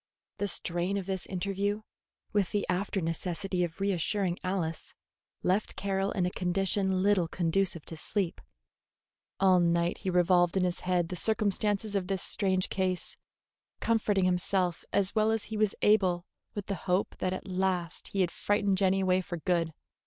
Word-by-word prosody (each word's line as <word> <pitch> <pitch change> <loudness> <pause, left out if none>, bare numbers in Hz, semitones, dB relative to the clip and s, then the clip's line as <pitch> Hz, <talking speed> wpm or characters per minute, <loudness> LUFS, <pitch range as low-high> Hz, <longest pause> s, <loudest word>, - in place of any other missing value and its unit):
The 205 - 0
strain 175 +1 0
of 195 - -3
this 190 -1 -3
interview, 200 +3 -2 0.5
with 205 -3 +2
the 205 - 0
after 190 +2 -1
necessity 180 +2 -2
of 170 0 -4
reassuring 195 -1 0
Alice, 185 -4 -3 0.5
left 190 +4 +1
Carroll 195 0 -1
in 185 -3 +1
a 180 - -1
condition 190 +1 +1
little 200 -4 +3
conducive 170 0 0
to 165 - -5
sleep. 180 +2 -2 1.0
All 185 -2 +5
night 170 0 +1
he 190 - -2
revolved 180 0 +3
in 185 - +2
his 180 -1 0
head 180 -2 0
the 180 - -3
circumstances 210 +1 0
of 190 -2 0
this 190 -1 -2
strange 190 -2 +2
case, 185 -2 -1 0.6
comforting 210 -4 +2
himself 180 -1 +1
as 195 -1 +1
well 215 0 +3
as 225 -1 +1
he 220 - -5
was 215 -2 +2
able 185 -4 +3 0.3
with 205 -2 -4
the 200 - -2 0.2
hope 180 +3 +1
that 185 - 0
at 185 - -5
last 185 -2 -1
he 195 - -1
had 175 -2 +1
frightened 205 -1 +1
Jenny 195 0 +3
away 185 0 +3
for 175 -1 -5
good. 170 -1 0
185 Hz, 165 wpm, -30 LUFS, 180-200 Hz, 1.0 s, All